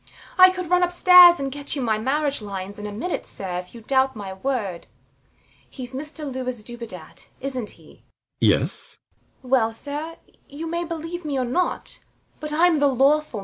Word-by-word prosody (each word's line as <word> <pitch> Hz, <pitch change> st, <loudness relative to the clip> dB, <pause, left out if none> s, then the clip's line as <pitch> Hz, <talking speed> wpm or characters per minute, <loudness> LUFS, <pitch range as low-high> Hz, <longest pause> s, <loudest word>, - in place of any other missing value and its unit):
I 370 Hz, 0 st, +9 dB
could 365 Hz, -2 st, -5 dB
run 360 Hz, 0 st, +4 dB
upstairs 355 Hz, 0 st, +7 dB
and 275 Hz, -1 st, -3 dB
get 285 Hz, +2 st, -4 dB
you 280 Hz, -, -3 dB
my 220 Hz, -2 st, 0 dB
marriage 280 Hz, +3 st, -1 dB
lines 200 Hz, 0 st, -6 dB
in 210 Hz, -, -5 dB
a -, -, -6 dB
minute, 240 Hz, -, -3 dB
sir, 180 Hz, -2 st, -5 dB
if 180 Hz, +5 st, -11 dB
you 235 Hz, -, -10 dB
doubt 265 Hz, +2 st, +1 dB
my 200 Hz, -3 st, -6 dB
word. 200 Hz, -5 st, -3 dB, 0.8 s
He's 255 Hz, -1 st, -9 dB
Mr 300 Hz, +3 st, -6 dB
Louis 255 Hz, -4 st, -4 dB
Dubedat, 230 Hz, -8 st, -10 dB
isnt 260 Hz, -5 st, -4 dB
he? -, -, -19 dB, 0.4 s
RIDGEON. -, -, +5 dB
Yes. -, -, -7 dB, 0.5 s
THE -, -, -13 dB
MAID. -, -, -10 dB
Well, 230 Hz, -4 st, +3 dB
sir, 295 Hz, +7 st, -6 dB, 0.3 s
you 295 Hz, +3 st, -7 dB
may 340 Hz, +1 st, -2 dB
believe 335 Hz, +1 st, -6 dB
me 290 Hz, -3 st, -2 dB
or 255 Hz, -, 0 dB
not; 350 Hz, +10 st, -2 dB, 0.4 s
but 305 Hz, -1 st, -5 dB
I'm 325 Hz, +1 st, +3 dB
the 285 Hz, -, +4 dB
lawful 270 Hz, +1 st, +4 dB
Mrs 305 Hz, 0 st, +1 dB
Dubedat. 215 Hz, -, -3 dB
270 Hz, 190 wpm, -23 LUFS, 225-315 Hz, 0.8 s, I